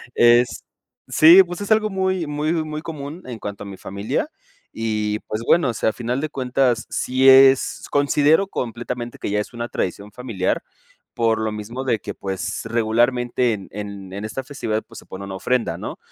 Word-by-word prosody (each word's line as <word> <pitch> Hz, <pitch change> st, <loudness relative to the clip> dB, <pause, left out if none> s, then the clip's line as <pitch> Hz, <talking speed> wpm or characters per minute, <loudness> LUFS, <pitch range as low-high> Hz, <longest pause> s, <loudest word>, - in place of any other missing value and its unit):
es 120 Hz, +1 st, +4 dB, 0.4 s
sí, 170 Hz, +5 st, +8 dB
pues, 175 Hz, +2 st, -7 dB
es 205 Hz, -, -5 dB
algo 215 Hz, 0 st, +4 dB
muy 190 Hz, -3 st, -1 dB
muy 150 Hz, +2 st, -1 dB
muy 155 Hz, -2 st, -3 dB
común 155 Hz, +2 st, -7 dB
en 120 Hz, -3 st, -7 dB
cuanto 100 Hz, -1 st, -6 dB
a -, -, -9 dB
mi 100 Hz, -1 st, -8 dB
familia 100 Hz, +3 st, -3 dB, 0.4 s
y, 105 Hz, -1 st, -2 dB
pues, 110 Hz, -, -3 dB
bueno, 165 Hz, -6 st, +4 dB
o -, -, -1 dB
sea, 110 Hz, -, +1 dB
a -, -, -4 dB
final 125 Hz, +3 st, -2 dB
de 155 Hz, -, -2 dB
cuentas, 130 Hz, -3 st, 0 dB
si 130 Hz, +1 st, +1 dB
es, 135 Hz, 0 st, +6 dB
considero 145 Hz, +5 st, +3 dB
completamente 120 Hz, -, -5 dB
que -, -, -3 dB
ya 105 Hz, -, +1 dB
es 105 Hz, -, -5 dB
una 120 Hz, 0 st, -4 dB
tradición 100 Hz, +3 st, -3 dB
familiar, 110 Hz, -7 st, -2 dB, 0.5 s
por 115 Hz, -1 st, +2 dB
lo 110 Hz, 0 st, -1 dB
mismo 105 Hz, +5 st, -6 dB
de 125 Hz, -4 st, +1 dB
que, -, -, -6 dB
pues, 95 Hz, -1 st, -4 dB
regularmente 120 Hz, +1 st, +1 dB
en 100 Hz, -3 st, -7 dB
en 100 Hz, -2 st, -7 dB
en 100 Hz, +2 st, -5 dB
esta 120 Hz, +5 st, -5 dB
festividad, 125 Hz, -6 st, -3 dB
pues, -, -, -11 dB
se -, -, -16 dB
pone 95 Hz, +1 st, -7 dB
una 95 Hz, -1 st, -6 dB
ofrenda, 125 Hz, +4 st, 0 dB
¿no?, -, -, -6 dB
120 Hz, 190 wpm, -21 LUFS, 110-145 Hz, 0.5 s, sí